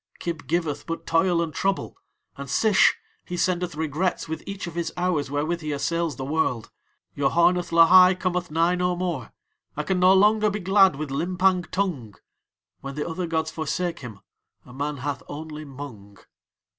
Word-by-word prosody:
Kib 165 -5 -5
giveth 155 -2 -2
but 165 - -5
toil 170 +1 +2
and 160 -2 -5
trouble; 195 +5 -1 0.4
and 140 -1 -8
Sish, 210 - +4 0.3
he 175 - -6
sendeth 180 -2 0
regrets 160 +4 -1
with 160 0 -5
each 200 0 -5
of 170 - -7
his 170 0 -3
hours 175 -6 0
wherewith 155 +4 -2
he 155 -1 -4
assails 165 +1 -1
the 130 - -5
World. 135 -6 -1 0.4
Yoharneth 170 +5 +2
Lahai 180 +3 +7
cometh 180 -1 -1
nigh 165 +3 +2
no 180 0 0
more. 175 -9 -3 0.5
I 150 - -1
can 185 +3 0
no 185 +1 +6
longer 210 +2 +4
be 210 +1 -3
glad 190 -2 +4
with 150 -1 -5
Limpang 180 +4 +1
Tung. 160 - -2 0.6
When 140 0 -7
the 150 - -3
other 175 +1 -3
gods 160 -1 -1
forsake 170 +2 -3
him 110 -6 -10 0.4
a 125 - -14
man 145 +2 -3
hath 140 0 -4
only 155 +1 -7
Mung." 125 -8 -10
165 Hz, 170 wpm, -24 LUFS, 145-180 Hz, 0.6 s, Lahai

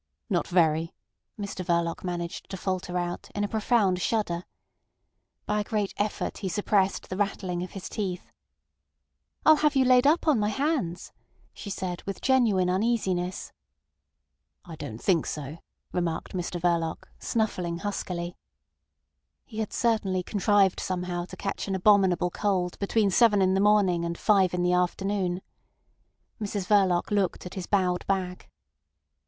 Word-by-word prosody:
"Not 175 - +1
very," 165 -2 +2 0.4
Mr 200 -2 -4
Verloc 170 -1 0
managed 175 -2 -4
to 190 - -5
falter 185 -1 -2
out, 175 0 -3
in 205 - 0
a - - +1
profound 210 -4 +1
shudder. 180 -6 -1 1.0
By 210 0 0
a - - 0
great 205 -2 -2
effort 205 +1 -2
he 190 - -3
suppressed 195 +1 +1
the 185 - -4
rattling 190 -3 -1
of 180 - -6
his 195 - -6
teeth. 190 -4 -4 1.1
"I'll 310 -1 +8
have 300 -1 +2
you 265 -1 +4
laid 255 +1 +5
up 320 +3 +3
on 290 -7 +4
my 210 0 +1
hands," 270 - -1 0.4
she 205 - -8
said, 185 -2 -4
with 195 - -4
genuine 230 -9 +3
uneasiness. 185 -2 0 1.1
"I 170 -3 -8
don't 145 -8 -7
think 170 -1 +1
so," 150 +2 -5 0.3
remarked 170 -2 -2
Mr 175 -1 -3
Verloc, 170 -2 0
snuffling 180 -7 -1
huskily. 175 -2 -4 1.1
He 220 -2 -8
had 220 - -2
certainly 205 -6 +1
contrived 200 -1 +2
somehow 180 -1 -3
to - - -11
catch 195 - -3
an 195 - -1
abominable 190 -2 +4
cold 185 -3 -1
between 200 0 +2
seven 210 0 +5
in 190 -1 +3
the 190 - +2
morning 200 -5 +3
and 170 0 -3
five 195 -4 +3
in 175 - 0
the 180 0 +2
afternoon. 180 0 0 1.0
Mrs 200 -2 -2
Verloc 190 -3 +3
looked 200 -4 0
at 180 - -7
his 185 -3 -5
bowed 180 -3 +1
back. 185 -2 -2
190 Hz, 150 wpm, -27 LUFS, 175-205 Hz, 1.1 s, I'll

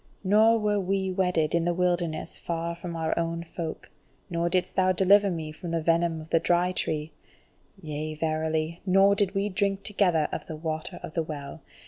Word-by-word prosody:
Nor 215 +4 +5
were 210 -1 +1
we 190 0 -1
wedded 180 -4 +1
in 170 -1 +2
the 175 0 0
wilderness 175 -3 -1
far 170 0 -3
from 170 0 -7
our 160 -1 0
own 165 0 -2
folk. 165 -1 -6 0.4
Nor 170 0 0
didst 180 0 0
thou 185 -1 +3
deliver 200 +2 +5
me 160 -3 -4
from 170 +3 -8
the 165 -1 -1
venom 165 0 +2
of 155 0 -11
the 165 - +4
Dry 175 +2 +2
Tree. 155 -3 -2 0.7
Yea 155 -2 -5
verily, 160 +1 -1
nor 195 +1 +5
did 200 -1 0
we 200 +1 +1
drink 200 0 -1
together 180 -7 +2
of - - -5
the 160 - -5
Water 155 0 -4
of - - -7
the 165 - 0
Well! 150 -1 -7
170 Hz, 185 wpm, -27 LUFS, 160-190 Hz, 0.7 s, Nor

